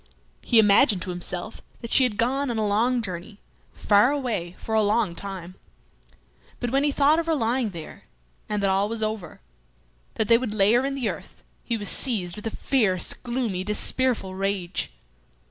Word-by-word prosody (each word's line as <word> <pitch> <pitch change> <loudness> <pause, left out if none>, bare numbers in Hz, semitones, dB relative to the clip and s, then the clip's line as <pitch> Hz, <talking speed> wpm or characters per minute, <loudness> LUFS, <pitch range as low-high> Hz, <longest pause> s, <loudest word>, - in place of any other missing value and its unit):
He 235 - +2
imagined 210 -1 +5
to 185 - -5
himself 180 +4 -5 0.3
she 260 +3 +5
had 215 -5 -2
gone 270 +4 0
on 235 - -2
a 215 - 0
long 230 +4 +1
journey, 185 +2 -7 0.4
far 205 +4 +4
away, 225 -11 -3
for 220 - -6
a 220 - +4
long 210 -3 +1
time. 185 -1 -7 1.1
But 245 -1 -3
when 275 +1 +2
he 290 - +2
thought 290 +3 +3
of 335 - -3
her 325 - +2
lying 240 -2 0
there, 170 -5 -10 0.4
and 210 -1 -1
that 195 - +2
all 195 +2 +1
was 225 -1 -1
over, 215 - -4 0.7
that 220 - 0
they 230 0 +5
would 235 -4 -4
lay 205 +1 +4
her 245 +2 +3
in 275 - -3
the 260 -4 -2
earth, - - -7 0.2
he 235 - -2
was 205 -2 -4
seized 195 -10 +1
with 210 +1 -6
a 225 - -5
fierce, 210 -10 +1
gloomy, 235 -7 -3
despairful 210 0 0
rage. 190 -2 -2
215 Hz, 180 wpm, -24 LUFS, 195-245 Hz, 1.1 s, imagined